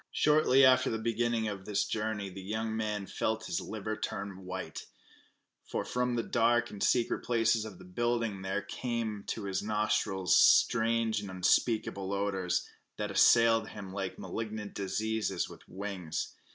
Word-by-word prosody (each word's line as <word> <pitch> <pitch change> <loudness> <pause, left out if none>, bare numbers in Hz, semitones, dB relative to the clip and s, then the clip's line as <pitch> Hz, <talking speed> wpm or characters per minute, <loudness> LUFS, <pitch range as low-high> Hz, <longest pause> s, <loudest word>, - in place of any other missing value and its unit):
Shortly 150 -3 +5
after 130 -1 +5
the 110 - -1
beginning 115 0 0
of 100 -2 -5
this 105 -2 0
journey 105 -3 -3
the 95 +1 -8
young 110 +3 -3
man 105 -2 -2
felt 110 +3 -2
his - - -2
liver 110 0 -4
turn 100 -2 -5
white, 95 -3 -6 0.8
for - - -3
from 125 0 -1
the 115 - 0
dark 120 +1 +2
and 100 - -9
secret 120 -2 +2
places 115 -2 +2
of 105 -4 -9
the - - -13
building 115 +1 -1
there 95 +2 -2
suddenly - - -8
came 115 -4 -2
to 110 - -3
his 95 -1 -2
nostrils 105 -3 +1
strange 115 -1 +4
and 100 -2 -7
unspeakable 100 +1 +1
odors, 95 -3 -1 0.3
that - - -3
assailed 115 -1 +5
him 100 -3 -8
like 95 -1 -4
malignant 110 -2 -5
diseases 110 +3 -1
with - - -12
wings. 90 -5 -4
110 Hz, 155 wpm, -31 LUFS, 95-115 Hz, 0.8 s, Shortly